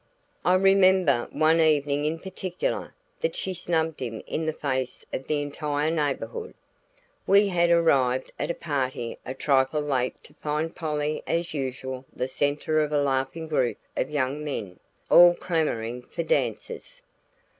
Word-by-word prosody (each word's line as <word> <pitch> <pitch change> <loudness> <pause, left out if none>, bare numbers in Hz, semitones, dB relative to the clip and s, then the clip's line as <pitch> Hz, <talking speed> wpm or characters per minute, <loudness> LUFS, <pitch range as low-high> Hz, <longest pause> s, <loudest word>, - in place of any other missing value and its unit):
I 180 - +4
remember 185 -8 +4
one 160 +1 +3
evening 145 -2 +2
in 155 +2 0
particular 185 0 -4 0.2
that - - -1
she 190 - -3
snubbed 165 -3 -1
him 115 -4 -5
in 160 0 -3
the - - +2
face 130 -4 -3
of 130 - -4
the 150 -1 0
entire 145 +1 -1
neighborhood. 165 - -2 0.7
We 200 +1 +5
had 175 -2 +2
arrived 135 -7 +3
at 145 - -2
a 170 - -1
party 130 -6 -3
a 130 - -4
trifle 135 +2 +2
late 130 -4 0
to - - -17
find 155 +2 -3
Polly 150 -2 -2
as 170 0 -1
usual 130 -2 -4
the 125 - -3
center 145 +3 0
of 150 -1 -1
a 150 - +2
laughing 135 +3 -1
group 130 -6 0 0.2
of 130 - -1
young 145 0 -1
men, 105 -11 -5 0.3
all 175 0 +9
clamoring 125 -10 -1
for - - -5
dances. - - -2
150 Hz, 150 wpm, -26 LUFS, 135-170 Hz, 0.7 s, all